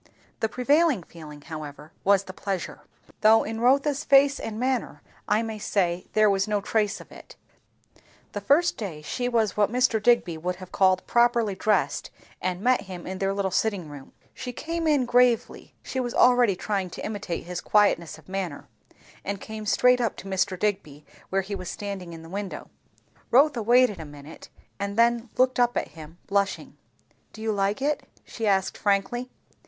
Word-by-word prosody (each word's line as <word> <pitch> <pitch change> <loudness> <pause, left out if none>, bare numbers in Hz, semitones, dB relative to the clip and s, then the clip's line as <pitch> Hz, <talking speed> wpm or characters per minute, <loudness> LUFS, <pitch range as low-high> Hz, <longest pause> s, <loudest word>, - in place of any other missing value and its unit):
The 220 - 0
prevailing 280 - +2
feeling 155 -3 -12
however 150 -1 -8
was 200 0 +4
the 185 - -9
pleasure; 195 -1 -4 0.4
though 220 +1 +6
in 225 +1 -5
Rotha's 275 +3 +2
face 275 -1 +5
and 220 0 -5
manner 250 - -2 0.2
I 215 +2 +2
may 220 -1 -5
say 180 -4 -1
there 215 0 +5
was 195 -1 +2
no 210 -1 +1
trace 210 0 0
of - - -14
it, - - -13 1.0
the 205 - -5
first 295 - +3
day 170 -8 -6
she 245 +10 -2
was 225 -5 +1
what 210 0 +2
Mr. 245 -3 +2
Digby 205 -8 +2
would 180 +2 -2
have 185 0 -12
called 185 -1 +2
"properly 235 -3 +2
dressed," 210 +3 0 0.3
and 185 0 -2
met 250 +1 +3
him 180 -2 -9
in 190 0 -5
their 195 0 0
little 195 -1 -1
sitting 190 -5 -1
room. 145 -2 -11 0.2
She 250 - -6
came 330 +4 -3
in 290 -4 +3
gravely, 245 -1 +1
(she 260 - -4
was 245 -2 -3
already 245 -5 +5
trying 195 0 -2
to - - -7
imitate 200 -5 -4
his 180 0 -5
quietness 185 -7 +2
of 160 - -19
manner) 185 -6 -4 0.6
and 200 0 -3
came 215 0 -7
straight 250 +3 +4
up 230 -4 0
to 195 - -10
Mr. 190 -1 0
Digby 155 -7 -3 0.2
where 195 0 0
he 200 +2 -6
was 185 -3 -5
standing 195 -4 -6
in 165 -1 -10
the - - -11
window. 195 +2 -6 0.6
Rotha 275 0 +4
waited 240 -2 +4
a 160 - -6
minute, 145 +1 -12 0.3
and 200 +1 -3
then 235 0 +3
looked 255 0 +3
up 245 0 +2
at - - -2
him, 160 +1 -12
blushing. 200 0 -1 0.6
"Do 220 - -11
you 220 - 0
like 200 +4 0
it?" 295 +1 0 0.2
she 225 -2 -4
asked 195 -1 +1
frankly. 205 +5 0
205 Hz, 180 wpm, -25 LUFS, 185-240 Hz, 1.0 s, though